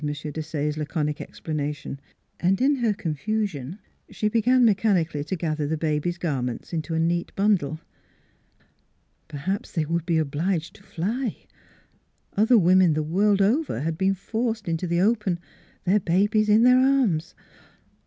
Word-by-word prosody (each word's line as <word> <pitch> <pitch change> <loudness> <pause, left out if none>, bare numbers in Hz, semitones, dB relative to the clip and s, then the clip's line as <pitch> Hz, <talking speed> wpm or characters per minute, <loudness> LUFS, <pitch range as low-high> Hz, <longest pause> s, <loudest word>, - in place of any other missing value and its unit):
Desaye's 150 0 -3
laconic 150 -1 -2
explana 150 -2 -4
tion, 140 - -8 0.4
and 185 +2 +2
in 275 +2 +3
her 235 -4 +1
confusion 180 -3 -3 0.3
she 215 - -1
began 245 +3 +3
mechanically 190 -8 +2
to 185 - -3
gather 155 -3 -2
the 160 +2 -1
baby's 155 +2 -1
garments 135 -6 -3
into 160 0 -2
a - - +1
neat 170 +1 0
bundle.... 185 -7 +1 1.5
Perhaps 155 +7 -4
they 160 -3 0
would 170 +1 -1
be 170 -2 +2
obliged 160 +3 -1
to - - -18
fly. 220 +7 -3 0.9
Other 220 +4 +5
women 180 -3 +5
the 155 - 0
world 195 +5 +2
over 265 - +1
had 160 +2 -1
been 190 +3 +1
forced 220 +2 -3
into 165 +2 -1
the 170 0 0
open, 210 -4 +1 0.5
their 195 +4 +3
babies 205 +4 +2
in 215 +2 +5
their 250 +1 +6
arms. 255 - +2
175 Hz, 145 wpm, -24 LUFS, 155-210 Hz, 1.5 s, their